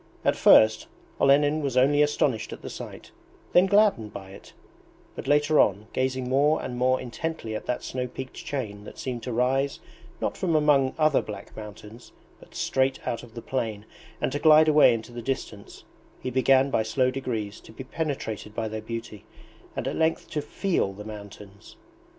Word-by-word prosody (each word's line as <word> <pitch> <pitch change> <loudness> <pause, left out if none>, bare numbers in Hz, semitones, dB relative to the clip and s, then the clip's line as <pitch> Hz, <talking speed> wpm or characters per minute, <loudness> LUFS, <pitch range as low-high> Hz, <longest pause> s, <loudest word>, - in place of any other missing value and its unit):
At - - +3
first 110 0 +5 0.3
Olenin 145 +2 +4
was 135 -3 -2
only 145 +3 +4
astonished 135 -6 +1
at - - -9
the - - -6
sight, - - -9 0.4
then 180 +2 +6
gladdened 200 - +3
by 95 -1 -9
it; 95 - -14 0.6
but - - -7
later 150 +1 +3
on, 105 +1 +3
gazing 130 -1 -1
more 145 +4 +3
and 125 - -5
more 130 +1 +2
intently 125 -1 -5
at - - -6
that 125 - -2
snow 125 -1 -3
peaked 130 +1 -8
chain 105 -7 -5
that - - -11
seemed 125 -2 -4
to 125 - -5
rise 130 +4 0 0.4
not - - -2
from 170 -4 0
among 145 -3 +3
other 155 -3 +3
black 100 -2 -9
mountains, 110 +2 -11 0.3
but - - -18
straight 130 0 +1
out 115 - -2
of 115 -2 -15
the 115 - -7
plain, 110 -5 -3 0.3
and - - -1
to 145 - -2
glide 155 0 +6
away 150 -5 +6
into 115 +2 -7
the 120 0 -7
distance, 115 -5 -5 0.4
he 130 - -4
began 130 +2 +3
by - - +2
slow 125 +4 +1
degrees 115 -6 -4
to - - -15
be 120 - -8
penetrated 130 -8 -4
by 115 -1 -2
their 110 0 -5
beauty 110 -2 -7 0.5
and - - -3
at - - -2
length 160 0 0
to 150 - -1
FEEL 150 - -1
the 105 +2 -10
mountains. 100 -1 -11
130 Hz, 180 wpm, -26 LUFS, 110-145 Hz, 0.6 s, then